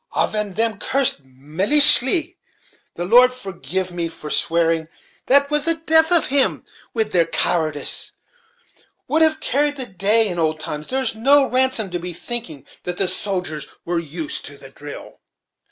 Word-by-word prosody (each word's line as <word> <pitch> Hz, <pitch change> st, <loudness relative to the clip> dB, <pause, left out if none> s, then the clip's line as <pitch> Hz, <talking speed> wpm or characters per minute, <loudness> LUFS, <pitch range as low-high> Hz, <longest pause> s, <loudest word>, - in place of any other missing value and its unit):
Aven 210 Hz, -3 st, -2 dB
them 225 Hz, -2 st, -1 dB
cursed 270 Hz, -, 0 dB
millaishy, 255 Hz, -, +4 dB, 0.6 s
the 175 Hz, -, -5 dB
Lord 245 Hz, +6 st, +5 dB
forgive 190 Hz, -, -4 dB
me 175 Hz, -1 st, -3 dB
for 155 Hz, -2 st, -9 dB
swearing, 165 Hz, -1 st, 0 dB, 0.4 s
that 280 Hz, +2 st, +3 dB
was 295 Hz, 0 st, 0 dB
the 330 Hz, 0 st, +3 dB
death 320 Hz, 0 st, +2 dB
of 345 Hz, -2 st, +3 dB
him, 275 Hz, 0 st, 0 dB, 0.3 s
wid 220 Hz, -2 st, -2 dB
their 170 Hz, -2 st, +2 dB
cowardice, 155 Hz, -4 st, 0 dB, 1.0 s
would 315 Hz, -, 0 dB
have 315 Hz, 0 st, +2 dB
carried 290 Hz, +1 st, -1 dB
the 265 Hz, -3 st, -3 dB
day 210 Hz, +2 st, +2 dB
in 175 Hz, -3 st, -4 dB
old 155 Hz, -1 st, -1 dB
times. 150 Hz, -1 st, -6 dB
There's 260 Hz, -3 st, -1 dB
no 270 Hz, +5 st, +3 dB
rason 255 Hz, -6 st, 0 dB
to 175 Hz, -, -3 dB
be 175 Hz, +1 st, -6 dB
thinking 175 Hz, -, -5 dB, 0.2 s
that 180 Hz, 0 st, -5 dB
the 195 Hz, -, 0 dB
soldiers 180 Hz, -6 st, -3 dB, 0.2 s
were 170 Hz, 0 st, -2 dB
used 160 Hz, -1 st, -5 dB
to 145 Hz, 0 st, -7 dB
the 135 Hz, -1 st, -13 dB
drill." 145 Hz, +1 st, -11 dB
200 Hz, 155 wpm, -19 LUFS, 165-265 Hz, 1.0 s, Lord